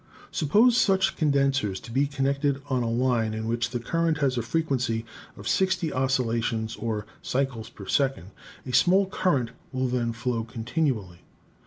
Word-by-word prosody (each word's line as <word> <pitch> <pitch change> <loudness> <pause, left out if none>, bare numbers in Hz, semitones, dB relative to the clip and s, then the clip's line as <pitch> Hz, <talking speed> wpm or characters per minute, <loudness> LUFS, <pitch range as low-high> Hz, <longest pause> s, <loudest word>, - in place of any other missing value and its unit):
Suppose 215 - +4
such 190 -5 +3
con 155 -3 +2
densers 135 -8 +1
to 115 - -9
be 135 +4 +2
connected 140 0 0
on 130 -1 +2
a 115 - -1
line 115 -2 +1
in 110 0 -3
which 120 +1 0
the 120 0 -3
current 165 +5 0
has 140 -3 +1
a 120 - 0
frequency 125 -4 -1 0.3
of - - -8
60 185 -4 +1
oscillations 115 -4 0
or 110 -2 -3 0.2
cycles 125 -4 -2
per 100 - -11
second: 130 -5 0 0.3
a 125 - -6
small 185 +10 +5
current 145 - 0 0.2
will 130 0 0
then 120 -2 0
flow 115 0 -2
continually. 115 - -2
130 Hz, 160 wpm, -26 LUFS, 115-140 Hz, 0.3 s, small